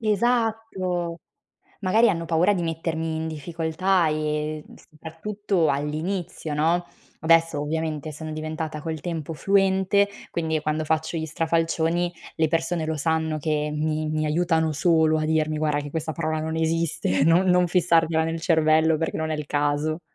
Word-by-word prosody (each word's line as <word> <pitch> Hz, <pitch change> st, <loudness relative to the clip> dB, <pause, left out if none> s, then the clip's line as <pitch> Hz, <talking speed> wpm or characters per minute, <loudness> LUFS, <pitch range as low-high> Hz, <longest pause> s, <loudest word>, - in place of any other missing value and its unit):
Esatto! 215 Hz, -6 st, 0 dB, 0.6 s
Magari 215 Hz, +4 st, +4 dB
hanno 170 Hz, -3 st, -3 dB
paura 170 Hz, +5 st, +3 dB
di 185 Hz, -4 st, -1 dB
mettermi 165 Hz, -1 st, -2 dB
in 160 Hz, 0 st, -3 dB
difficoltà 165 Hz, +3 st, 0 dB
e 155 Hz, 0 st, -2 dB
soprattutto 165 Hz, +2 st, -2 dB
all'inizio, 155 Hz, +3 st, -3 dB
no, 165 Hz, +4 st, +1 dB, 0.4 s
adesso 165 Hz, -1 st, +3 dB
ovviamente 155 Hz, 0 st, -3 dB
sono 155 Hz, +1 st, -7 dB
diventata 155 Hz, 0 st, -4 dB
col 160 Hz, -1 st, -4 dB
tempo 165 Hz, -1 st, -4 dB
fluente, 195 Hz, +3 st, +2 dB, 0.2 s
quindi 160 Hz, -2 st, -1 dB
quando 155 Hz, +1 st, -1 dB
faccio 160 Hz, +2 st, -1 dB
gli 160 Hz, -, -2 dB
strafalcioni 165 Hz, +2 st, 0 dB, 0.2 s
le 160 Hz, 0 st, +2 dB
persone 165 Hz, +1 st, 0 dB
lo 160 Hz, 0 st, -2 dB
sanno 160 Hz, 0 st, 0 dB
che 150 Hz, 0 st, -1 dB
mi 155 Hz, 0 st, -1 dB
mi 155 Hz, 0 st, 0 dB
aiutano 160 Hz, 0 st, +1 dB
solo 160 Hz, +1 st, +3 dB
a 155 Hz, -, -1 dB
dirmi: 155 Hz, 0 st, +1 dB
"Guarda 150 Hz, -1 st, 0 dB
che 145 Hz, -, -6 dB
quella 160 Hz, +1 st, -3 dB
parola 155 Hz, -1 st, -2 dB
non 160 Hz, +1 st, -3 dB
esiste, 160 Hz, -, 0 dB
non 170 Hz, +4 st, +4 dB
non 180 Hz, 0 st, +4 dB
fissartela 165 Hz, -2 st, +2 dB
nel 165 Hz, 0 st, -3 dB
cervello 160 Hz, -1 st, +3 dB
perché 160 Hz, -, -2 dB
non 160 Hz, 0 st, -2 dB
è -, -, 0 dB
il 150 Hz, -1 st, -5 dB
caso". 145 Hz, +2 st, 0 dB
160 Hz, 150 wpm, -24 LUFS, 155-170 Hz, 0.6 s, Magari